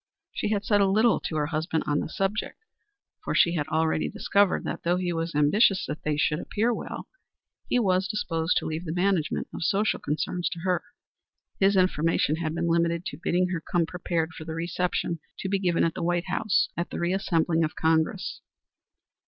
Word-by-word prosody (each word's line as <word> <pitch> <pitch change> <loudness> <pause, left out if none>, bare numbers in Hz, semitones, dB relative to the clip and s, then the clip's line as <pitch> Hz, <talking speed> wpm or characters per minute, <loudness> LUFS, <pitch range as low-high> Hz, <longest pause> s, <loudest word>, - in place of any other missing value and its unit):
She - - -2
had 205 -1 -1
said 205 -1 +3
little 215 +4 +4
to 160 - -4
her 150 -1 +1
husband 160 +1 -1
on 145 0 +1
the - - -3
subject, 195 +4 -2 0.7
for - - -2
she 170 - +4
had 150 -4 -1
already 160 0 +1
discovered 200 -2 +2
that, - - -4
though 175 +1 +1
he 180 -1 -1
was 165 -1 -3
ambitious 190 +7 +4
that 150 +2 -5
they 150 -1 0
should 150 +1 +1
appear 225 +6 0
well, - - -6 0.6
he - - +2
was 190 -5 +2
disposed 165 -4 0
to - - -1
leave 160 +3 -3
the 160 0 -3
management 180 -3 0
of - - -4
social 200 +5 +1
concerns 170 +4 -2
to 170 - -8
her. 180 0 0 0.8
His 195 +1 +4
information 165 -4 +2
had 160 -1 -2
been 170 0 -1
limited 170 +1 +1
to 145 - -6
bidding 180 +1 +1
her 180 -3 -2
come 175 0 0
prepared 165 -1 -2
for 160 - -8
the 160 0 -6
reception 170 0 -1 0.2
to - - -4
be 195 0 0
given 175 -3 +1
at 165 - +1
the - - -5
White 175 +1 0
House 215 - +1
at 170 - -3
the - - -5
reassembling 175 -2 +1
of 155 - -2
Congress. 160 0 0
170 Hz, 195 wpm, -26 LUFS, 160-190 Hz, 0.8 s, little